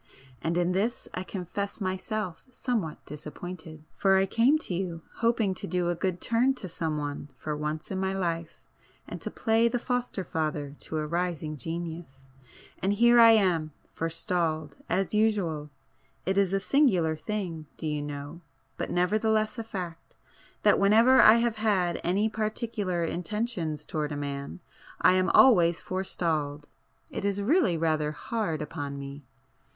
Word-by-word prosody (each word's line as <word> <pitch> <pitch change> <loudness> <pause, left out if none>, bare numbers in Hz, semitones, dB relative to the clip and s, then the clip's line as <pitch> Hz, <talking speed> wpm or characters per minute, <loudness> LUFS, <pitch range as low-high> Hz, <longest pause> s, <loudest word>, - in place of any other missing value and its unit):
And 165 +4 -1
in 175 0 +2
this 210 +6 -1
I 185 - -3
confess 195 +2 -4
myself 190 -1 -3
somewhat 235 - -3
disappointed,—for 160 +4 -2
I 190 - +4
came 235 +9 +4
to 305 - -5
you 170 -2 -3
hoping 230 -4 +2
to 195 - -6
do 180 -2 0
a 175 - 0
good 180 +1 -2
turn 245 +6 +2
to 200 - -7
some 160 -2 -2
one 145 0 -4
for 150 -1 -3
once 150 +3 -4
in 190 - -2
my 190 0 0
life, 170 -4 -2 0.5
and - - -7
to - - -2
play 225 +1 +2
the 235 - 0
foster 245 -5 -2
father 150 -4 -3
to 160 - -5
a 155 - -1
rising 170 -2 -2
genius—and 160 - -6
here 235 +3 +6
I 230 -1 +9
am—forestalled,—as 165 -1 -1
usual! 195 -9 +1 0.6
It 190 - +1
is 195 -2 +3
a 195 - +2
singular 190 - +3
thing, 170 -4 -4
do - - -6
you 150 -1 -1
know, 145 +3 -6 0.4
but - - -3
nevertheless 215 +4 +1
a - - -2
fact, 180 -6 -7 0.5
that - - +5
whenever 225 +6 +6
I 215 - +9
have 235 -1 +1
had 190 -6 +1
any 195 +5 +2
particular 215 -4 -2
intentions 175 -4 -2
towards 150 -1 -2
a - - -4
man 140 +3 -5 0.4
I - - +6
am 185 -1 +2
always 175 -9 +6
forestalled! 155 -6 -2 0.5
It - - -4
is 200 0 0
really 215 - +3
rather 155 -2 0
hard 165 -4 -2
upon 140 -1 -5
me!" 140 +1 -7
180 Hz, 150 wpm, -28 LUFS, 155-215 Hz, 0.6 s, I